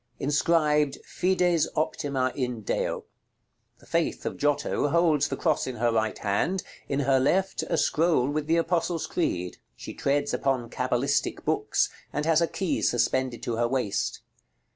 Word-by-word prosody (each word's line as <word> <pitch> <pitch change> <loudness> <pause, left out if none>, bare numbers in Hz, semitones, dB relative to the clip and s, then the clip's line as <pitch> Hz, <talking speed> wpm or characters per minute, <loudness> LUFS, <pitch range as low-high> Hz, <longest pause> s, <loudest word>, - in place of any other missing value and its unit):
Inscribed 150 0 +2
"FIDES 180 -3 +1
OPTIMA 140 -4 0
IN 125 -4 -3
DEO." 100 - -2 0.7
The - - -20
Faith - - -1
of - - -2
Giotto 145 0 0
holds 155 -2 +3
the - - -4
cross 155 -5 +1
in 130 - -4
her 120 +1 +1
right 110 -1 0
hand; 140 - 0 0.3
in 140 0 0
her 135 -1 +3
left, 190 +8 +1
a - - +1
scroll 155 -5 +2
with 145 +1 -2
the 165 +1 +3
Apostles' 170 -1 0
Creed. 90 - -2 0.2
She - - -8
treads 145 +1 0
upon 130 -4 -1
cabalistic 130 +2 0
books, - - +1 0.2
and 150 - -2
has 165 0 +4
a 170 - +3
key 190 -1 -2
suspended 120 +1 0
to 115 -2 -2
her 120 0 +2
waist. 125 -5 -1
145 Hz, 155 wpm, -27 LUFS, 125-165 Hz, 0.7 s, has